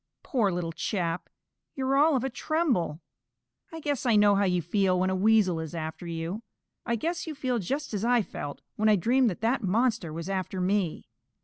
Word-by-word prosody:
Poor 225 -8 +1
little 175 -2 -2
chap, 170 -1 -2 0.5
you're 270 0 0
all 300 +2 +5
of 260 - 0
a 265 - -1
tremble. 245 - 0 0.7
I 325 - -7
guess 290 -4 -2
I 240 -4 +3
know 205 -1 +6
how 200 0 +2
you 180 -1 +2
feel 185 +2 +1
when 185 +1 +1
a - - 0
Weasel 195 -3 +3
is 160 +1 -6
after 160 +1 -5
you. 170 +5 -4 0.5
I 235 - +1
guess 335 +9 -3
you 310 - -4
feel 255 -4 -1
just 275 - -3
as 205 0 -2
I 240 -1 +3
felt 145 -6 -7
when 215 +1 +3
I 210 - +6
dreamed 240 +6 +3
that 185 - -6
that 235 +3 +1
monster 215 -3 +1
was 165 +2 -5
after 190 -1 -3
me. 185 -2 0
205 Hz, 200 wpm, -28 LUFS, 180-250 Hz, 0.7 s, know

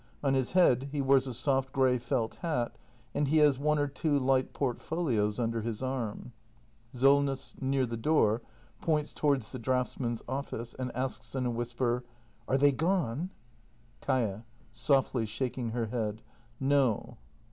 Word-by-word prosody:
On 135 -1 +2
his 130 -2 0
head 140 -7 +4
he 145 - -2
wears 135 -1 +4
a 130 - -4
soft 130 +1 0
grey 130 -2 +3
felt 115 -1 -1
hat, 155 -9 -1 0.4
and 145 - +1
he 155 +3 +3
has 145 -3 +5
one 150 +1 +2
or 145 - +2
two 145 +2 0
light 130 -1 +2
portfolios 125 -5 -1
under 115 -1 0
his 115 +2 -4
arm. 125 -2 -3 0.6
Solness. 135 +1 +2
[Near 135 0 +1
the 115 -1 -4
door, 115 -4 +2 0.4
points 150 -2 0
towards 140 -7 +1
the 130 - -5
draughtsmen's 125 -1 -1
office, 130 -3 -4
and 130 -1 -4
asks 130 +1 -3
in 130 -1 0
a 120 - +1
whisper:] 120 +1 -1 0.4
Are 135 - +2
they 145 +1 +5
gone? 165 0 0 0.7
Kaia. 115 -5 0 0.3
[Softly, 120 0 +1
shaking 120 +2 -3
her 115 0 -1
head.] 110 -1 -3 0.4
No. 135 -4 +1
130 Hz, 150 wpm, -30 LUFS, 120-140 Hz, 0.7 s, has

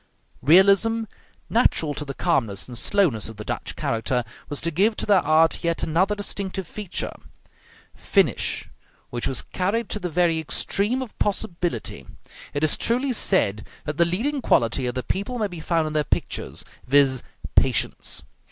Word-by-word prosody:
Realism, 200 +7 +5 0.4
natural 165 -10 +2
to 150 - -4
the 140 -1 -6
calmness 115 - 0
and 125 - -8
slowness 130 - +1
of 110 - -11
the 105 - -7
Dutch - - -4
character, 120 +2 -1 0.3
was 145 - 0
to 170 - 0
give 205 +7 +2
to - - -3
their 200 -2 +5
art 160 +3 +3
yet 170 -1 0
another 185 +6 +2
distinctive 200 -2 -3
feature, 210 -1 -4 0.8
finish, - - +1 0.4
which 120 -1 -2
was 135 - -1
carried 200 +5 0
to 210 - -3
the 180 - -3
very 170 0 +2
extreme 205 - 0
of 240 - -12
possibility. 170 - -2 0.4
It 145 - -2
is 155 - +4
truly 255 +3 +1
said 105 - +1 0.2
that 150 0 -3
the 170 - +5
leading 250 +12 -1
quality 120 - +2
of 125 - -3
the 125 - -2
people 200 - -2
may 220 - 0
be 175 -4 -6
found 165 0 0
in 155 - -4
their 155 -1 +2
pictures; - - -3 0.2
viz., 135 -2 +4 0.3
patience. - - +2
170 Hz, 160 wpm, -24 LUFS, 140-200 Hz, 0.8 s, Realism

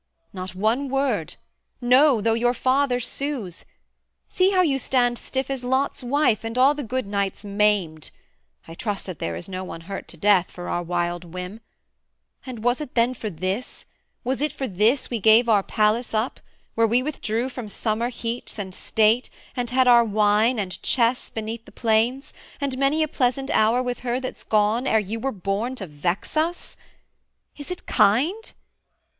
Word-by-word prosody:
Not 185 -1 -6
one 225 +8 0
word; 265 - 0 0.4
No! 255 0 +5
though 225 +2 +2
your 240 +2 +1
father 260 +1 +2
sues: 250 - -4 0.6
see 370 +1 +2
how 370 -2 +3
you 275 -5 +1
stand 245 -2 +1
Stiff 265 0 -3
as 270 -2 -4
Lot's 260 +3 0
wife, 250 -3 +1
and 225 +2 -4
all 265 +3 +6
the 295 - -5
good 255 0 -2
knights 200 0 -2
maimed, 200 -6 +1 0.6
I 165 - -9
trust 205 +3 -4
that 185 -6 -7
there 85 0 -3
is 85 - -7
no 185 0 -5
one 165 -2 -7
hurt 195 +3 -7
to 170 - -10
death, 195 0 +3
For 175 0 -8
our 175 - -1
wild 175 0 -2
whim: 180 +5 -7 0.9
and 240 -4 -7
was 245 +4 +1
it 295 - -7
then 240 +1 +3
for 220 -3 -5
this, 190 +7 -4 0.4
Was 260 +2 -1
it 300 -1 +1
for 270 -2 -4
this 220 +8 +1
we 235 - -1
gave 220 +3 +5
our 210 -3 +4
palace 215 +4 0
up, 220 +4 -1 0.3
Where 230 0 +3
we 240 +3 +2
withdrew 245 -5 -2
from 250 -3 -7
summer 220 +3 -1
heats 235 -1 -5
and 190 -3 -5
state, 220 +5 +2 0.3
And 245 -2 -2
had 255 +1 +3
our 240 -1 +7
wine 215 +2 +2
and 185 -4 -4
chess 240 0 +1
beneath 225 +1 -5
the - - -14
planes, 235 +5 0 0.3
And 280 -2 -2
many 275 +4 +2
a - - 0
pleasant 270 -1 0
hour 230 +4 +3
with 245 -1 -3
her 245 0 -1
that's 255 -1 -6
gone, 215 +4 +1
Ere 220 - +4
you 215 +2 -2
were 270 +4 -1
born 205 +5 -2
to 205 - -5
vex 170 - -3
us? 330 +3 -1 0.8
Is 290 +2 -9
it 360 - -6
kind? 305 - +2
230 Hz, 180 wpm, -24 LUFS, 205-260 Hz, 0.9 s, our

